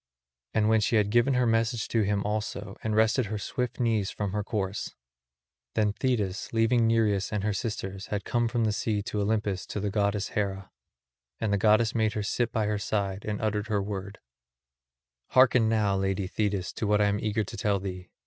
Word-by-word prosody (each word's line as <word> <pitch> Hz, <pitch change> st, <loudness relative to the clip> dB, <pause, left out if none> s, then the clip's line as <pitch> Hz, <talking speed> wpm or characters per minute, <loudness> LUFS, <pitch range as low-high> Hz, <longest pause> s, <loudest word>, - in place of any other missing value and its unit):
And 110 Hz, -1 st, +3 dB
when 110 Hz, 0 st, +4 dB
she 110 Hz, -, +1 dB
had 105 Hz, -1 st, +2 dB
given 120 Hz, +4 st, +3 dB
her 125 Hz, 0 st, +3 dB
message 115 Hz, 0 st, +1 dB
to 115 Hz, -, +2 dB
him 100 Hz, 0 st, 0 dB
also 105 Hz, -1 st, -3 dB
and 110 Hz, -1 st, -1 dB
rested 110 Hz, +2 st, +3 dB
her 105 Hz, +1 st, -3 dB
swift 125 Hz, +4 st, -3 dB
knees 110 Hz, -5 st, +1 dB
from 100 Hz, -2 st, -3 dB
her 105 Hz, +1 st, -1 dB
course, 100 Hz, -1 st, -3 dB, 0.8 s
then 105 Hz, -2 st, +2 dB
Thetis 105 Hz, -7 st, -1 dB
leaving 115 Hz, +1 st, +3 dB
Nereus 105 Hz, -4 st, +2 dB
and 105 Hz, -2 st, -1 dB
her 105 Hz, 0 st, 0 dB
sisters 95 Hz, -2 st, -4 dB
had 105 Hz, -1 st, -3 dB
come 120 Hz, -1 st, +1 dB
from 120 Hz, 0 st, 0 dB
the 110 Hz, -, +2 dB
sea 105 Hz, -1 st, -1 dB
to 105 Hz, 0 st, -2 dB
Olympus 105 Hz, -2 st, -1 dB
to -, -, -4 dB
the 100 Hz, 0 st, -2 dB
goddess 100 Hz, -1 st, 0 dB
Hera; 100 Hz, -2 st, -3 dB, 0.7 s
and 110 Hz, -2 st, 0 dB
the -, -, +3 dB
goddess 110 Hz, +2 st, +4 dB
made 110 Hz, -2 st, +1 dB
her 105 Hz, -, -2 dB
sit 120 Hz, +3 st, 0 dB
by 110 Hz, -3 st, 0 dB
her 105 Hz, 0 st, -1 dB
side 100 Hz, -1 st, -2 dB
and 105 Hz, -1 st, -2 dB
uttered 105 Hz, 0 st, 0 dB
her 105 Hz, -2 st, +1 dB
word: 100 Hz, 0 st, -5 dB, 1.2 s
"Hearken 130 Hz, -3 st, +5 dB
now, 105 Hz, -3 st, +2 dB
lady 95 Hz, 0 st, 0 dB
Thetis, 100 Hz, -1 st, -2 dB
to 110 Hz, -, -2 dB
what 105 Hz, 0 st, +3 dB
I 105 Hz, -, +4 dB
am 100 Hz, 0 st, +1 dB
eager 110 Hz, 0 st, 0 dB
to -, -, -8 dB
tell 100 Hz, -3 st, +1 dB
thee. 90 Hz, -1 st, -6 dB
105 Hz, 200 wpm, -28 LUFS, 100-110 Hz, 1.2 s, Hearken